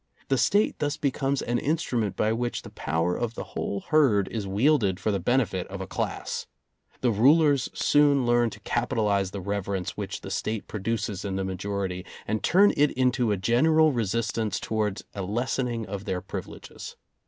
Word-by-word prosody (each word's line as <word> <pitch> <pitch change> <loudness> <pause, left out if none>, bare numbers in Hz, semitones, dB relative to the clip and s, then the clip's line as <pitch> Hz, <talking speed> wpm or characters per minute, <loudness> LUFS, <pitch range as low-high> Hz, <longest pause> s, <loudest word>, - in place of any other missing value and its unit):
The 135 - +3
State 205 +2 +2
thus 145 -1 -1
becomes 140 -1 0
an 120 0 0
instrument 125 - -1
by 110 +1 +1
which 120 +1 -2
the - - -10
power 80 +4 -1
of 115 -1 -3
the - - -4
whole 100 -1 -3
herd 130 -11 +4
is 105 -4 -4
wielded 100 -2 +2
for 110 - 0
the 100 - 0
benefit 105 -2 0
of - - -7
a - - -4
class. - - -3 0.5
The 125 - +3
rulers 140 +5 +4
soon 145 -3 +4
learn 120 0 +3
to 105 0 -11
capitalize 105 -4 0
the 100 0 -6
reverence 100 -1 -2
which 100 -2 -4
the 95 - -7
State 110 +2 -3
produces 105 -2 -3
in 100 -2 -3
the 95 - -1
majority, 95 -1 -3 0.2
and 110 +1 -1
turn 200 +4 +5
it 145 0 +4
into 125 -3 +2
a 100 - +1
general 155 - +4
resistance 115 -1 -1
towards 105 -2 -2
a 100 - -4
lessening 120 +3 -1
of 100 0 -6
their 95 -4 -1
privileges. 95 - -8
110 Hz, 175 wpm, -26 LUFS, 100-130 Hz, 0.5 s, turn